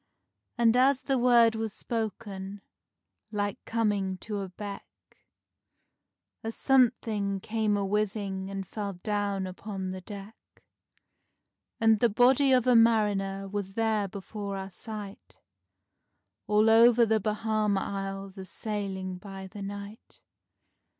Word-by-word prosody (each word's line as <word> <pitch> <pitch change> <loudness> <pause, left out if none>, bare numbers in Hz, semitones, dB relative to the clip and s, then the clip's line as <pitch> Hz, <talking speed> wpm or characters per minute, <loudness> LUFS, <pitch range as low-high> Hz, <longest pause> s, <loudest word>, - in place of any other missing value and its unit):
And 235 -1 +4
as 265 +1 +4
the 265 0 0
word 240 -2 +5
was 220 -2 -3
spoken—like 205 -1 -6
coming 205 -4 0
to 210 +2 -5
a 195 -1 -4
beck— 200 +2 -10 1.2
A 225 - -2
something 225 -6 +2
came 215 0 0
a 200 - -1
whizzing 195 -1 -1
and 195 -1 -4
fell 205 -2 -4
down 200 +1 -2
upon 190 0 -5
the 185 0 -6
deck, 200 +3 -9 1.4
And 225 -1 +4
the 235 - +4
body 255 +5 +4
of 255 -2 +4
a 250 -1 +5
mariner 205 -4 +3
was 195 -1 -4
there 220 -2 +1
before 200 +1 -6
our 190 0 -6
sight, 210 -1 -8 1.1
All 210 +1 +4
over 235 +1 +7
the 220 0 +2
Bahama 215 -1 0
Isles 195 0 -5
a 190 - -6
sailing 190 -3 -4
by 195 -1 -8
the 195 +2 -9
night. 200 +2 -8
205 Hz, 120 wpm, -28 LUFS, 195-225 Hz, 1.4 s, over